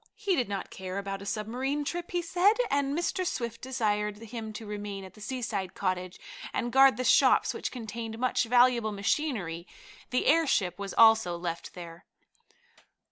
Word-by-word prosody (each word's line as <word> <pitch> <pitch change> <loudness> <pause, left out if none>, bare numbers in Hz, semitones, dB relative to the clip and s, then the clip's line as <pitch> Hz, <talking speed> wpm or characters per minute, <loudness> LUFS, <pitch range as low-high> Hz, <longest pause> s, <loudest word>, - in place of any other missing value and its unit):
He 410 -4 0
did 245 - 0
not 200 -2 -4
care 185 0 -6
about 195 0 -4
a 200 - -8
submarine 255 +8 -2
trip, 345 +3 -4
he 350 -1 -1
said, 365 +5 +3 0.2
and 280 +1 +1
Mr. 345 +2 -1
Swift 235 -9 -3
desired 210 -5 -1
him 225 0 -7
to 220 +1 -7
remain 205 -1 -5
at 190 - -11
the 215 - -16
seaside 215 -5 -3
cottage 185 -1 -2 0.3
and 240 - -2
guard 265 -3 +6
the 255 - -1
shops, - - +4
which - - -4
contained 225 -2 -6
much 250 0 +1
valuable 240 -2 +4
machinery. 200 - -2 0.4
The 250 - 0
airship 270 - +2
was 200 -1 -5
also 220 -6 +5
left 170 -1 -5
there. 170 0 -10
225 Hz, 165 wpm, -29 LUFS, 200-260 Hz, 0.4 s, guard